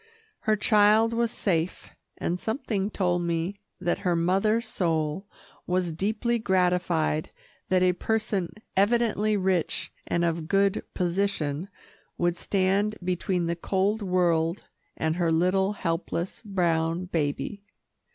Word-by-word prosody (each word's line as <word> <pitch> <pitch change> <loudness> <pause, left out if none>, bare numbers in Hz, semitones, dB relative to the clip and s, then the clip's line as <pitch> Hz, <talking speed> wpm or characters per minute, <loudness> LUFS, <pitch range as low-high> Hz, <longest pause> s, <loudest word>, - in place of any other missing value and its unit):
Her 215 - +5
child 215 +2 +4
was 235 0 +1
safe, 175 -5 -2 0.3
and 175 +1 -2
something 220 -4 -2
told 180 -4 0
me 170 +3 -2 0.2
that 175 -1 0
her 180 -2 +1
mother 195 +6 +2
soul 165 -4 -1 0.4
was 180 -2 0
deeply 220 +7 0
gratified 180 -5 +1 0.4
that 185 -1 +3
a 180 0 +4
person 210 -2 -1 0.3
evidently 215 0 +2
rich 185 -3 0
and 170 0 +1
of 165 -1 -1
good 195 +3 +2
position 180 -3 -1 0.5
would 175 0 +1
stand 195 +3 +1
between 180 0 0
the 170 0 -1
cold 195 +5 0
world 175 -2 +1 0.3
and 160 +1 0
her 170 -2 +1
little, 185 +4 +2
helpless, 170 -1 -3
brown 170 -3 0
baby. 155 +3 -2
185 Hz, 120 wpm, -27 LUFS, 170-205 Hz, 0.5 s, Her